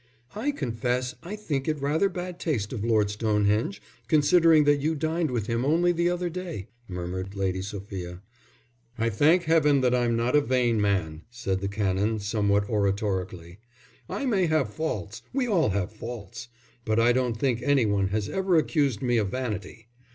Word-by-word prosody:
"I 220 Hz, +8 st, -2 dB
confess 125 Hz, -, -2 dB
I 185 Hz, +5 st, -6 dB
think 150 Hz, -11 st, -3 dB
it 155 Hz, -2 st, 0 dB
rather 150 Hz, +8 st, +1 dB
bad 180 Hz, -1 st, -6 dB
taste 120 Hz, -, -2 dB
of 110 Hz, -4 st, -4 dB
Lord 110 Hz, -3 st, +2 dB
Stonehenge, 105 Hz, -1 st, 0 dB, 0.3 s
considering 160 Hz, +2 st, +5 dB
that 145 Hz, -1 st, +3 dB
you 160 Hz, +3 st, 0 dB
dined 160 Hz, +1 st, -1 dB
with 120 Hz, -5 st, -2 dB
him 115 Hz, +2 st, -1 dB
only 170 Hz, +5 st, +3 dB
the 170 Hz, 0 st, +1 dB
other 175 Hz, 0 st, -1 dB
day," 170 Hz, -, -6 dB, 0.2 s
murmured 95 Hz, +2 st, -5 dB
Lady 95 Hz, -1 st, -1 dB
Sophia. 95 Hz, -2 st, -7 dB, 0.7 s
"I 115 Hz, 0 st, 0 dB
thank 155 Hz, -, +4 dB
Heaven 155 Hz, -4 st, +3 dB
that 125 Hz, -1 st, +2 dB
I'm 120 Hz, -2 st, +2 dB
not 120 Hz, +4 st, +1 dB
a 150 Hz, -, +6 dB
vain 125 Hz, -5 st, +1 dB
man," 85 Hz, -6 st, 0 dB
said 100 Hz, -6 st, -2 dB
the 100 Hz, -, -1 dB
Canon, 100 Hz, +1 st, 0 dB
somewhat 100 Hz, -1 st, +1 dB
oratorically. 95 Hz, -4 st, -2 dB, 0.5 s
"I 280 Hz, -, -3 dB
may 195 Hz, -8 st, +2 dB
have 155 Hz, -9 st, 0 dB
faults; 110 Hz, -, -4 dB
we 265 Hz, -1 st, +1 dB
all 180 Hz, -, +2 dB
have 95 Hz, -1 st, -1 dB
faults. 115 Hz, +1 st, -8 dB, 0.4 s
But 110 Hz, 0 st, +1 dB
I 120 Hz, +1 st, +4 dB
don't 125 Hz, -2 st, 0 dB
think 125 Hz, -1 st, 0 dB
any 140 Hz, -4 st, +3 dB
one 100 Hz, -2 st, +1 dB
has 105 Hz, +1 st, -2 dB
ever 190 Hz, -, 0 dB
accused 145 Hz, -8 st, +1 dB
me 120 Hz, -1 st, +2 dB
of 105 Hz, -3 st, +1 dB
vanity. 110 Hz, -2 st, -5 dB
120 Hz, 175 wpm, -26 LUFS, 100-155 Hz, 0.7 s, a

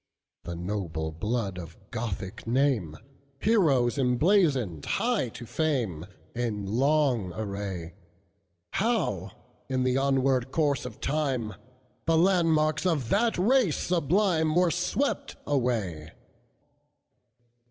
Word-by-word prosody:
The 85 Hz, -, -4 dB
noble 85 Hz, -3 st, -3 dB
blood 100 Hz, +2 st, -2 dB
of 85 Hz, -1 st, -9 dB
Gothic 110 Hz, -2 st, -5 dB
name, 115 Hz, -, +1 dB, 0.4 s
Heroes 145 Hz, -, +3 dB
emblazoned 130 Hz, -, +2 dB
high 225 Hz, -, 0 dB
to 120 Hz, -, -9 dB
fame, 115 Hz, -, -1 dB, 0.3 s
In 115 Hz, -4 st, -2 dB
long 125 Hz, -2 st, +1 dB
array; 100 Hz, -5 st, -5 dB, 0.8 s
How, 190 Hz, -, 0 dB, 0.4 s
in 130 Hz, -1 st, 0 dB
the 130 Hz, 0 st, +2 dB
onward 135 Hz, -2 st, +2 dB
course 145 Hz, -5 st, +1 dB
of 115 Hz, -, -12 dB
time, 135 Hz, -7 st, -1 dB, 0.5 s
The 165 Hz, -1 st, +4 dB
landmarks 160 Hz, -3 st, +3 dB
of 145 Hz, -10 st, 0 dB
that 230 Hz, +3 st, +2 dB
race 220 Hz, -, +3 dB
sublimeWere 170 Hz, 0 st, +2 dB
swept 265 Hz, +10 st, -1 dB
away! 110 Hz, -, -1 dB
130 Hz, 100 wpm, -27 LUFS, 105-160 Hz, 0.8 s, The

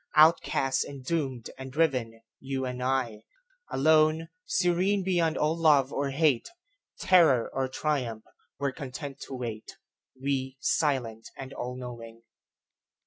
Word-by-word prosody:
Outcast 150 Hz, -4 st, +4 dB
and 135 Hz, -2 st, -9 dB
doomed 135 Hz, -7 st, -2 dB
and 130 Hz, 0 st, -7 dB
driven, 130 Hz, -7 st, 0 dB, 0.2 s
you 135 Hz, 0 st, -3 dB
and 125 Hz, 0 st, -4 dB
I,Alone, 155 Hz, -, 0 dB, 0.2 s
serene 185 Hz, +2 st, +1 dB
beyond 175 Hz, -4 st, +1 dB
all 155 Hz, +2 st, +1 dB
love 150 Hz, -5 st, +4 dB
or 140 Hz, 0 st, -1 dB
hate, 140 Hz, -3 st, +2 dB, 0.5 s
Terror 160 Hz, -10 st, +5 dB
or 135 Hz, 0 st, 0 dB
triumph, 130 Hz, -5 st, -2 dB, 0.3 s
were 140 Hz, 0 st, -1 dB
content 135 Hz, +1 st, -7 dB
to 135 Hz, -, -6 dB
wait, 115 Hz, -4 st, -6 dB, 0.4 s
We, 135 Hz, -1 st, -2 dB
silent 125 Hz, -8 st, 0 dB
and 135 Hz, 0 st, -7 dB
all 125 Hz, +1 st, -5 dB
knowing. 115 Hz, -2 st, -9 dB
135 Hz, 120 wpm, -28 LUFS, 125-155 Hz, 0.5 s, Terror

